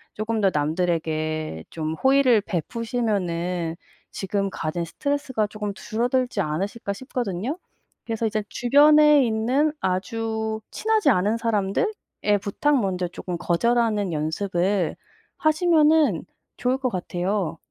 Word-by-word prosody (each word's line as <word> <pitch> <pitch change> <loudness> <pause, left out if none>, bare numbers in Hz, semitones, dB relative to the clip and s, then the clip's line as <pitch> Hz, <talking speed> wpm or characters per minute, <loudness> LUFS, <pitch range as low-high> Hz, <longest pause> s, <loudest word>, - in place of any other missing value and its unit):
쪼금 215 +1 -1
더 195 - +4
남들에게 155 - -1
좀 155 -1 -3
호의를 265 +2 +4
베푸시면은 180 -4 -2 0.4
지금 195 0 -2
가진 170 0 -3
스트레스가 260 - -1
쪼금 210 -1 -5
줄어들지 245 +2 -1
않으실까 195 +6 -3
싶거든요. 240 - -3 0.5
그래서 225 0 -2
이제 215 -1 -1
주변에 295 +3 +6
있는 245 +7 +1
아주 220 +4 -2
친하지 435 -7 +2
않은 210 +3 +2
사람들의 210 - 0 0.5
부탁 280 +8 +1
먼저 185 -3 -1
쪼금 175 0 -6
거절하는 210 +2 +1
연습을 175 +4 0 0.4
하시면은 310 - +3 0.3
좋을 250 +1 +1
것 260 -2 0
같아요. 185 -1 -2
210 Hz, 280 characters per minute, -24 LUFS, 180-245 Hz, 0.5 s, 주변에